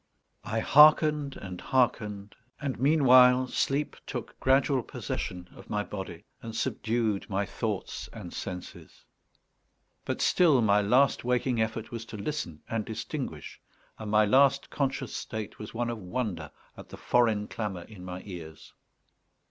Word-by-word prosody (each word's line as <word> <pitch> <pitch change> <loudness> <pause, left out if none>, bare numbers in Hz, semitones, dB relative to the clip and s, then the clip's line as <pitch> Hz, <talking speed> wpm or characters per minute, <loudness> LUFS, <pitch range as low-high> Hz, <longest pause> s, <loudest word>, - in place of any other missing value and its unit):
I 110 +1 -1
hearkened 150 0 +5
and 90 -2 -8
hearkened; 105 -6 0 0.3
and 140 -5 -3
meanwhile 130 -3 +6
sleep 140 +3 -1
took - - -6
gradual 135 0 +3
possession 90 -4 -5
of - - -14
my 105 0 -1
body 95 -5 -7 0.2
and 115 -1 -7
subdued 110 -3 -1
my 100 0 0
thoughts 105 0 -4
and 95 -6 -9
senses; 90 -2 -8 1.0
but - - -3
still 160 -7 +4
my 105 -1 +4
last 125 +7 +3
waking 125 -1 +1
effort 110 0 -3
was 115 -1 -5
to 110 - -8
listen 100 - -4
and 115 -1 -2
distinguish, 110 - -6 0.4
and 110 -1 -6
my 105 0 +4
last 135 +5 +3
conscious 140 -2 -2
state 110 -2 -6
was 105 - -8
one 120 0 -1
of 115 - -5
wonder 90 -6 -4 0.3
at - - -12
the - - -9
foreign 110 -4 +2
clamour 100 -6 -4
in 100 -2 -12
my 90 0 -7
ears. 85 -5 -10
110 Hz, 140 wpm, -28 LUFS, 100-130 Hz, 1.0 s, meanwhile